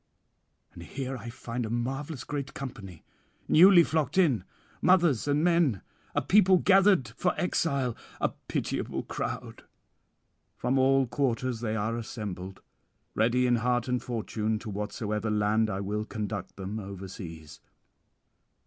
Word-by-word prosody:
'And -, -, -11 dB
here 135 Hz, -1 st, -5 dB
I 120 Hz, -1 st, -7 dB
find 120 Hz, 0 st, -5 dB
a 110 Hz, -, -4 dB
marvellous 130 Hz, +4 st, -3 dB
great 140 Hz, -2 st, -5 dB
company, 100 Hz, -, -8 dB, 0.4 s
newly 175 Hz, +1 st, +8 dB
flocked 155 Hz, -2 st, -1 dB
in, 140 Hz, -, +3 dB, 0.4 s
mothers 170 Hz, -9 st, +3 dB
and 145 Hz, +2 st, +2 dB
men, 170 Hz, -, +2 dB, 0.3 s
a -, -, +1 dB
people 190 Hz, -2 st, +5 dB
gathered 190 Hz, -, +4 dB
for 180 Hz, +11 st, -1 dB
exile, 140 Hz, -9 st, 0 dB, 0.2 s
[799 -, -, 0 dB
804]a -, -, -22 dB
pitiable -, -, -2 dB
crowd. -, -, -5 dB, 0.9 s
From 130 Hz, +2 st, +1 dB
all 135 Hz, 0 st, +4 dB
quarters 125 Hz, -2 st, -1 dB
they 110 Hz, -2 st, -2 dB
are 110 Hz, +2 st, -1 dB
assembled, 100 Hz, -5 st, -6 dB, 0.5 s
ready 120 Hz, +3 st, +2 dB
in 120 Hz, -1 st, +3 dB
heart 120 Hz, +1 st, 0 dB
and 125 Hz, -1 st, 0 dB
fortune, 110 Hz, -2 st, -2 dB
to 110 Hz, -1 st, -7 dB
whatsoever 105 Hz, +1 st, -3 dB
land 105 Hz, +1 st, +2 dB
I 95 Hz, -1 st, -2 dB
will 105 Hz, +2 st, -2 dB
conduct 105 Hz, -3 st, -5 dB
them 100 Hz, +3 st, -5 dB
overseas. 95 Hz, -5 st, -8 dB
120 Hz, 135 wpm, -28 LUFS, 105-140 Hz, 0.9 s, newly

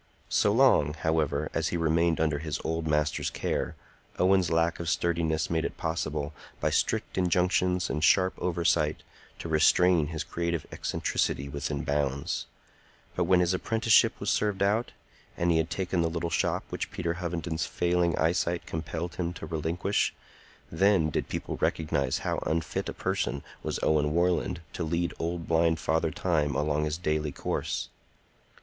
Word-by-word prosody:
So 105 Hz, -, +3 dB
long, 105 Hz, -, +4 dB
however, 75 Hz, -2 st, 0 dB
as 80 Hz, -1 st, 0 dB
he 85 Hz, -, -1 dB
remained 85 Hz, 0 st, +2 dB
under 80 Hz, -2 st, +1 dB
his 75 Hz, -1 st, -3 dB
old 80 Hz, 0 st, -2 dB
master's 75 Hz, -1 st, +1 dB
care, -, -, -2 dB, 0.4 s
Owen's 95 Hz, -2 st, +3 dB
lack 85 Hz, 0 st, +1 dB
of 85 Hz, -1 st, -2 dB
sturdiness 80 Hz, -2 st, 0 dB
made 80 Hz, -1 st, 0 dB
it -, -, -4 dB
possible, 75 Hz, -2 st, -2 dB, 0.3 s
by -, -, 0 dB
strict -, -, 0 dB
injunctions 90 Hz, 0 st, +2 dB
and 75 Hz, -, -2 dB
sharp 95 Hz, +2 st, +4 dB
oversight, 85 Hz, -3 st, +1 dB, 0.3 s
to -, -, -6 dB
restrain 80 Hz, +1 st, +4 dB
his 80 Hz, -1 st, -4 dB
creative 85 Hz, -1 st, -2 dB
eccentricity 70 Hz, -, -1 dB
within 70 Hz, 0 st, -3 dB
bounds; 70 Hz, -2 st, -1 dB, 0.7 s
but -, -, +1 dB
when 90 Hz, -1 st, +4 dB
his 90 Hz, +1 st, +2 dB
apprenticeship 115 Hz, +4 st, +3 dB
was 100 Hz, -, 0 dB
served 105 Hz, -2 st, +1 dB
out, 105 Hz, +4 st, +1 dB, 0.5 s
and 85 Hz, 0 st, +2 dB
he 80 Hz, -, +3 dB
had 80 Hz, 0 st, 0 dB
taken 90 Hz, -2 st, -1 dB
the 85 Hz, -, +1 dB
little 85 Hz, 0 st, -3 dB
shop -, -, 0 dB
which -, -, -3 dB
Peter 85 Hz, -1 st, -2 dB
Hovenden's 85 Hz, -3 st, -2 dB
failing 85 Hz, -1 st, +1 dB
eyesight 85 Hz, +1 st, +1 dB
compelled 80 Hz, +1 st, -4 dB
him 85 Hz, -1 st, -2 dB
to 85 Hz, -, -7 dB
relinquish, 80 Hz, +5 st, -1 dB, 0.6 s
then 85 Hz, -2 st, +3 dB
did -, -, -2 dB
people -, -, -4 dB
recognize 70 Hz, -4 st, 0 dB
how -, -, 0 dB
unfit 80 Hz, +1 st, -1 dB
a -, -, -4 dB
person 70 Hz, -, -2 dB, 0.2 s
was -, -, -3 dB
Owen 75 Hz, -1 st, +2 dB
Warland 85 Hz, 0 st, +1 dB
to 90 Hz, -, -3 dB
lead 85 Hz, +2 st, -1 dB
old 85 Hz, 0 st, -3 dB
blind 80 Hz, 0 st, +3 dB
Father 80 Hz, +3 st, 0 dB
Time 75 Hz, -4 st, 0 dB
along 75 Hz, +1 st, +1 dB
his 75 Hz, +1 st, -2 dB
daily 75 Hz, -3 st, -1 dB
course. -, -, -3 dB
85 Hz, 155 wpm, -28 LUFS, 75-90 Hz, 0.7 s, long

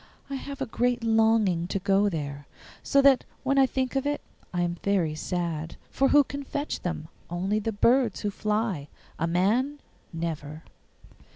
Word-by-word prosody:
I -, -, -2 dB
have 275 Hz, +1 st, -6 dB
a -, -, +1 dB
great 245 Hz, 0 st, 0 dB
longing 220 Hz, -6 st, +3 dB
to 195 Hz, -, -1 dB
go 195 Hz, +1 st, +3 dB
there, 145 Hz, -4 st, -5 dB, 0.3 s
so 280 Hz, 0 st, +3 dB
that 275 Hz, -2 st, +6 dB, 0.2 s
when 275 Hz, 0 st, +2 dB
I 265 Hz, -, +6 dB
think 260 Hz, 0 st, -2 dB
of 270 Hz, +1 st, 0 dB
it 290 Hz, 0 st, -1 dB, 0.3 s
I 175 Hz, -, -1 dB
am 175 Hz, 0 st, -2 dB
very 185 Hz, -6 st, +1 dB
sad. 165 Hz, -1 st, -3 dB, 0.2 s
For 270 Hz, -, +3 dB
who 290 Hz, +1 st, +6 dB
can 280 Hz, +1 st, -6 dB
fetch 285 Hz, +2 st, -3 dB
them? 170 Hz, -3 st, -3 dB, 0.2 s
Only 190 Hz, +5 st, 0 dB
the 225 Hz, +1 st, -2 dB
birds 235 Hz, +1 st, +3 dB
who 205 Hz, -, -1 dB
fly; 210 Hz, -7 st, -1 dB, 0.3 s
a 165 Hz, -, +1 dB
man, 225 Hz, +12 st, +1 dB, 0.3 s
never. 160 Hz, -2 st, -5 dB
205 Hz, 170 wpm, -27 LUFS, 170-260 Hz, 0.3 s, that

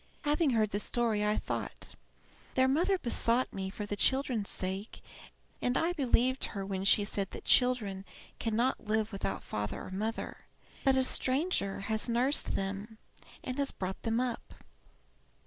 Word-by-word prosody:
Having 295 Hz, +1 st, +2 dB
heard 220 Hz, -4 st, +2 dB
the 205 Hz, -, -1 dB
story, 225 Hz, -1 st, 0 dB
I 210 Hz, 0 st, +1 dB
thought, -, -, -4 dB, 0.7 s
'Their 260 Hz, 0 st, +4 dB
mother 345 Hz, +8 st, +2 dB
besought 240 Hz, -3 st, +2 dB
me 190 Hz, -1 st, -3 dB
for 205 Hz, +1 st, -5 dB
the 205 Hz, -, -3 dB
children's 250 Hz, -2 st, +1 dB
sake, 190 Hz, +3 st, -3 dB, 0.6 s
and 245 Hz, +1 st, +1 dB
I 335 Hz, +2 st, +1 dB
believed 260 Hz, -3 st, +2 dB
her 195 Hz, -2 st, -5 dB
when 195 Hz, -1 st, -3 dB
she 205 Hz, +1 st, +5 dB
said 200 Hz, -1 st, -1 dB
that -, -, -9 dB
children 225 Hz, -7 st, +3 dB, 0.4 s
cannot 230 Hz, +1 st, 0 dB
live 215 Hz, 0 st, 0 dB
without 100 Hz, -, -3 dB
father 105 Hz, -1 st, -4 dB
or -, -, -9 dB
mother; 215 Hz, +4 st, -4 dB, 0.4 s
but 270 Hz, -1 st, +4 dB
a 260 Hz, -, +4 dB
stranger 260 Hz, -, +2 dB
has 220 Hz, +3 st, 0 dB
nursed 250 Hz, +5 st, +2 dB
them, 200 Hz, +3 st, -4 dB, 0.5 s
and 255 Hz, +2 st, -4 dB
has 280 Hz, -1 st, +2 dB
brought 190 Hz, 0 st, -5 dB
them 225 Hz, 0 st, 0 dB
up.' 250 Hz, -2 st, -3 dB
225 Hz, 155 wpm, -31 LUFS, 200-260 Hz, 0.7 s, she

